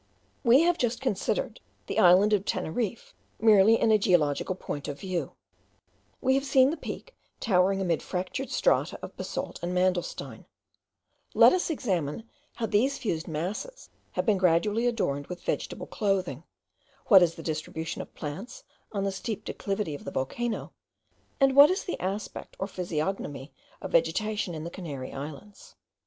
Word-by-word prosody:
We 250 Hz, +3 st, +6 dB
have 345 Hz, 0 st, +2 dB
just 240 Hz, -1 st, 0 dB
considered 265 Hz, -, -1 dB, 0.3 s
the -, -, -1 dB
island 185 Hz, +4 st, +6 dB
of 200 Hz, -2 st, +2 dB
Teneriffe 210 Hz, +4 st, -3 dB, 0.3 s
merely 220 Hz, 0 st, +6 dB
in 225 Hz, -, +3 dB
a 215 Hz, -, +5 dB
geological 175 Hz, -2 st, +2 dB
point 145 Hz, -6 st, -6 dB
of 145 Hz, -1 st, -5 dB
view; 180 Hz, -7 st, -3 dB, 0.9 s
we 260 Hz, -, +3 dB
have 270 Hz, 0 st, +2 dB
seen 270 Hz, -1 st, +4 dB
the -, -, -2 dB
Peak -, -, -8 dB, 0.2 s
towering 195 Hz, -2 st, +2 dB
amid 175 Hz, -4 st, 0 dB
fractured 185 Hz, +9 st, -4 dB
strata -, -, +1 dB
of -, -, -8 dB
basalt -, -, -5 dB
and 175 Hz, +1 st, -3 dB
mandelstein; 180 Hz, -1 st, -1 dB, 0.9 s
let -, -, +8 dB
us 365 Hz, -1 st, 0 dB
examine 195 Hz, -, -2 dB, 0.3 s
how 230 Hz, -, -2 dB
these 245 Hz, +7 st, +2 dB
fused 170 Hz, -7 st, -3 dB
masses 185 Hz, -, -5 dB, 0.2 s
have -, -, -1 dB
been 210 Hz, -4 st, +3 dB
gradually 200 Hz, +7 st, +2 dB
adorned 145 Hz, -12 st, -1 dB
with 180 Hz, -1 st, -8 dB
vegetable -, -, -3 dB
clothing, 185 Hz, -, -1 dB, 0.6 s
what 195 Hz, -4 st, +9 dB
is 170 Hz, -2 st, +3 dB
the 165 Hz, -, -9 dB
distribution 160 Hz, +1 st, -4 dB
of -, -, -12 dB
plants 165 Hz, -, -7 dB, 0.3 s
on 200 Hz, -2 st, -2 dB
the 195 Hz, -, 0 dB
steep 210 Hz, +2 st, -5 dB
declivity 195 Hz, -5 st, -3 dB
of 145 Hz, -, -8 dB
the -, -, -5 dB
volcano, 220 Hz, -, -3 dB, 0.7 s
and 270 Hz, -1 st, +4 dB
what 285 Hz, +1 st, +10 dB
is 370 Hz, +2 st, 0 dB
the 360 Hz, -, -4 dB
aspect 195 Hz, +3 st, -5 dB
or 190 Hz, -, -2 dB
physiognomy 160 Hz, -6 st, -4 dB, 0.3 s
of -, -, -5 dB
vegetation 215 Hz, -, +1 dB
in 155 Hz, -, -5 dB
the 170 Hz, -, -6 dB
Canary 145 Hz, -9 st, -6 dB
Islands. 150 Hz, +9 st, -9 dB
195 Hz, 155 wpm, -28 LUFS, 170-230 Hz, 0.9 s, what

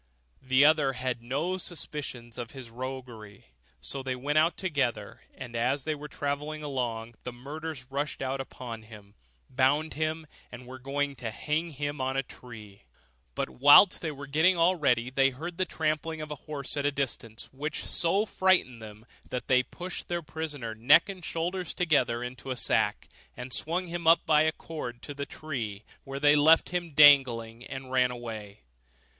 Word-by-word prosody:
The 130 Hz, +2 st, +4 dB
other 150 Hz, -3 st, +4 dB
had 125 Hz, -2 st, -3 dB
no 145 Hz, +10 st, -2 dB
suspicions 135 Hz, -9 st, -5 dB
of 120 Hz, -2 st, -6 dB
his 130 Hz, -4 st, -10 dB
roguery: 120 Hz, -5 st, -8 dB, 0.4 s
so 135 Hz, -, -3 dB
they 130 Hz, -1 st, -3 dB
went 145 Hz, +4 st, +1 dB
out 165 Hz, +3 st, +2 dB
together, 135 Hz, -, -2 dB
and 120 Hz, -3 st, -8 dB
as 130 Hz, +4 st, 0 dB
they 155 Hz, -, -1 dB
were 150 Hz, 0 st, -7 dB
travelling 150 Hz, +2 st, -3 dB
along, 120 Hz, -5 st, -3 dB
the 125 Hz, -, -5 dB
murderers 145 Hz, +2 st, -7 dB
rushed 145 Hz, +2 st, -2 dB
out 135 Hz, 0 st, -2 dB
upon 120 Hz, -3 st, -8 dB
him, 105 Hz, -2 st, -14 dB, 0.3 s
bound 140 Hz, +4 st, +1 dB
him, 155 Hz, +1 st, -2 dB, 0.3 s
and 125 Hz, 0 st, -10 dB
were 130 Hz, +1 st, -9 dB
going 140 Hz, +2 st, -2 dB
to 120 Hz, -2 st, -4 dB
hang 150 Hz, +9 st, -2 dB
him 145 Hz, -1 st, -4 dB
on 130 Hz, +1 st, -1 dB
a 135 Hz, -, +1 dB
tree. 110 Hz, -6 st, -12 dB, 0.5 s
But -, -, -2 dB
whilst 145 Hz, +8 st, +7 dB
they 165 Hz, -, -2 dB
were 145 Hz, -1 st, -7 dB
getting 160 Hz, +6 st, +3 dB
all 170 Hz, +3 st, +4 dB
ready, 125 Hz, -6 st, +1 dB
they 135 Hz, +1 st, +4 dB
heard 165 Hz, +7 st, -7 dB
the 185 Hz, -, +2 dB
trampling 160 Hz, -1 st, -2 dB
of 155 Hz, -1 st, -6 dB
a -, -, -3 dB
horse 145 Hz, -2 st, -4 dB
at 145 Hz, -, -1 dB
a -, -, +1 dB
distance, 120 Hz, -5 st, -4 dB
which 150 Hz, +3 st, -4 dB
so 190 Hz, +5 st, +2 dB
frightened 185 Hz, -, +2 dB
them 110 Hz, 0 st, -11 dB, 0.2 s
that 125 Hz, -, -4 dB
they 130 Hz, -1 st, +5 dB
pushed 175 Hz, +8 st, -7 dB
their 175 Hz, -1 st, -2 dB
prisoner 150 Hz, -6 st, -4 dB
neck 120 Hz, -, +5 dB
and 190 Hz, -3 st, -7 dB
shoulders 175 Hz, +2 st, -3 dB
together 130 Hz, -9 st, +1 dB
into 130 Hz, +2 st, -7 dB
a 130 Hz, -, -1 dB
sack, -, -, +1 dB, 0.3 s
and 125 Hz, 0 st, -6 dB
swung 175 Hz, +4 st, 0 dB
him 170 Hz, -1 st, -4 dB
up 165 Hz, +1 st, +6 dB
by 150 Hz, -1 st, +5 dB
a 155 Hz, 0 st, +3 dB
cord 135 Hz, -8 st, -7 dB
to 145 Hz, -, -6 dB
the 140 Hz, 0 st, -5 dB
tree, 115 Hz, -9 st, -5 dB, 0.2 s
where 135 Hz, 0 st, -5 dB
they 145 Hz, 0 st, +5 dB
left 155 Hz, +3 st, +5 dB
him 175 Hz, -1 st, -2 dB
dangling, 125 Hz, -6 st, +6 dB
and 130 Hz, +1 st, -8 dB
ran 125 Hz, -1 st, +3 dB
away. 110 Hz, -4 st, -7 dB
140 Hz, 180 wpm, -28 LUFS, 125-155 Hz, 0.5 s, whilst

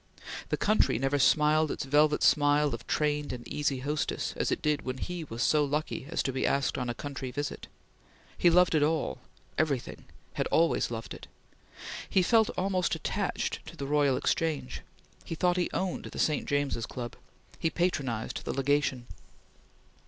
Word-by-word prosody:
The -, -, 0 dB
country 215 Hz, -, +3 dB
never 135 Hz, +3 st, 0 dB
smiled 155 Hz, +2 st, +4 dB
its -, -, -3 dB
velvet 150 Hz, +2 st, +3 dB
smile 145 Hz, 0 st, +4 dB
of -, -, -7 dB
trained 150 Hz, -1 st, 0 dB
and 125 Hz, -2 st, -7 dB
easy 140 Hz, -3 st, -1 dB
hostess 150 Hz, +3 st, -2 dB
as -, -, -1 dB
it -, -, -1 dB
did 150 Hz, -2 st, +1 dB
when 130 Hz, 0 st, -4 dB
he 175 Hz, +4 st, -4 dB
was 115 Hz, -3 st, -3 dB
so 150 Hz, -1 st, +4 dB
lucky 145 Hz, -1 st, -2 dB
as 165 Hz, -, -1 dB
to 135 Hz, -, -2 dB
be 130 Hz, -, -1 dB
asked 140 Hz, 0 st, +1 dB
on 125 Hz, -1 st, -2 dB
a 120 Hz, -, -3 dB
country 135 Hz, -2 st, -5 dB
visit. 145 Hz, +3 st, -4 dB, 0.7 s
He 175 Hz, -, +4 dB
loved 180 Hz, +1 st, +5 dB
it 155 Hz, -, +3 dB
all 150 Hz, -, 0 dB, 0.4 s
everything 145 Hz, -6 st, -1 dB, 0.3 s
had -, -, -1 dB
always 165 Hz, +1 st, +2 dB
loved 115 Hz, -1 st, -5 dB
it! -, -, -10 dB, 0.8 s
He 190 Hz, -, +3 dB
felt 220 Hz, +3 st, +4 dB
almost 185 Hz, -1 st, +1 dB
attached -, -, -2 dB
to -, -, -10 dB
the 140 Hz, -, -4 dB
Royal 140 Hz, -2 st, +2 dB
Exchange. 150 Hz, -6 st, -1 dB, 0.4 s
He 165 Hz, -, -5 dB
thought 180 Hz, +2 st, +2 dB
he 180 Hz, -, +1 dB
owned 185 Hz, -1 st, -2 dB
the -, -, -8 dB
St. 150 Hz, -2 st, +1 dB
James's 145 Hz, -5 st, -1 dB
Club. 120 Hz, -2 st, -6 dB, 0.4 s
He 165 Hz, -, +1 dB
patronized 140 Hz, -11 st, -1 dB
the -, -, -3 dB
Legation. 135 Hz, -2 st, +1 dB
145 Hz, 170 wpm, -29 LUFS, 135-160 Hz, 0.8 s, loved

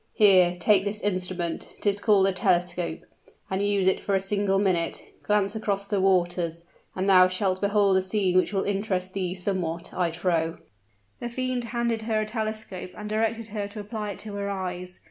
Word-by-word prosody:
Here, 185 Hz, -5 st, +6 dB
take 195 Hz, +2 st, +4 dB
this 205 Hz, +1 st, -3 dB
instrument 185 Hz, -3 st, -2 dB
'tis 205 Hz, -1 st, 0 dB
called 205 Hz, -3 st, +4 dB
a 195 Hz, -, +3 dB
telescope 180 Hz, -3 st, 0 dB, 0.5 s
and 190 Hz, +1 st, 0 dB
use 200 Hz, -2 st, +2 dB
it 190 Hz, -, +3 dB
for 200 Hz, -, -1 dB
a -, -, +3 dB
single 195 Hz, 0 st, 0 dB
minute. 185 Hz, -4 st, 0 dB, 0.2 s
Glance 205 Hz, 0 st, +1 dB
across 200 Hz, -2 st, -1 dB
the 200 Hz, -1 st, 0 dB
waters, 175 Hz, -3 st, +1 dB, 0.3 s
and 190 Hz, +1 st, -1 dB
thou 185 Hz, -2 st, +7 dB
shalt 185 Hz, 0 st, 0 dB
behold 200 Hz, -1 st, +3 dB
a -, -, +3 dB
scene 190 Hz, -1 st, 0 dB
which 185 Hz, -, +3 dB
will 195 Hz, -2 st, 0 dB
interest 195 Hz, -2 st, -1 dB
thee 185 Hz, -2 st, -2 dB
somewhat, 180 Hz, -3 st, -3 dB
I 180 Hz, -2 st, +1 dB
trow." 165 Hz, -1 st, -1 dB, 0.6 s
The 240 Hz, -, -4 dB
fiend 255 Hz, 0 st, -2 dB
handed 235 Hz, -1 st, -1 dB
her 220 Hz, -1 st, +2 dB
a 215 Hz, -, 0 dB
telescope 215 Hz, -4 st, -3 dB
and 210 Hz, -, -6 dB
directed 225 Hz, +1 st, -1 dB
her 205 Hz, -1 st, -3 dB
to 205 Hz, +1 st, -9 dB
apply 210 Hz, 0 st, -5 dB
it -, -, -13 dB
to 210 Hz, -1 st, -7 dB
her 200 Hz, 0 st, -3 dB
eyes. 180 Hz, -2 st, -5 dB
195 Hz, 185 wpm, -26 LUFS, 185-210 Hz, 0.6 s, thou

